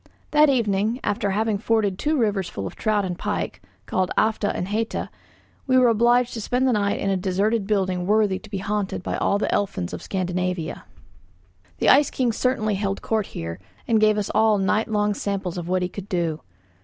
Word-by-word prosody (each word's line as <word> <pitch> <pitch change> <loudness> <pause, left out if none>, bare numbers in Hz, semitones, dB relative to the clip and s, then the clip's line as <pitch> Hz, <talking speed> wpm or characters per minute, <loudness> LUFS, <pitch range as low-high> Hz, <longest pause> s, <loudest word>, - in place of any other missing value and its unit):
That 300 0 +5
evening, 220 -2 +1
after 205 0 0
having 210 +1 0
forded 210 -4 +1
two 305 +1 +1
rivers 200 -7 0
full 100 - -5
of 95 - -6
trout 210 -2 0
and 180 -1 -3
pike, - - -3 0.2
called 185 -1 0
Alfa 220 -1 +2
and 180 - -3
Heta, 220 +2 -2 0.6
we 255 -1 +4
were 250 -2 +6
obliged 240 +2 +3
to 225 - -4
spend 250 +4 +1
the - - +3
night 200 -2 0
in 195 - 0
a - - +2
deserted 195 +3 0
building 185 -4 0
worthy 210 -2 +2
to 215 - -14
be 200 - -3
haunted 205 -1 -2
by - - -2
all 200 - +1
the - - -1
elfins 140 - -1
of - - -5
Scandinavia. 180 -2 -3 0.9
The - - +2
ice 285 +1 +6
king 250 -3 0
certainly 225 -2 0
held 195 0 -2
court 220 -3 0
here, 85 0 -6 0.3
and 225 -2 +3
gave 215 0 +4
us 210 - -2
all 215 0 +3
night 200 +3 +1
long 210 -1 +1
samples 195 -3 -3
of 170 - -6
what 185 0 +1
he - - 0
could 200 +2 -9
do. 170 -5 -1
205 Hz, 200 wpm, -23 LUFS, 190-220 Hz, 0.9 s, were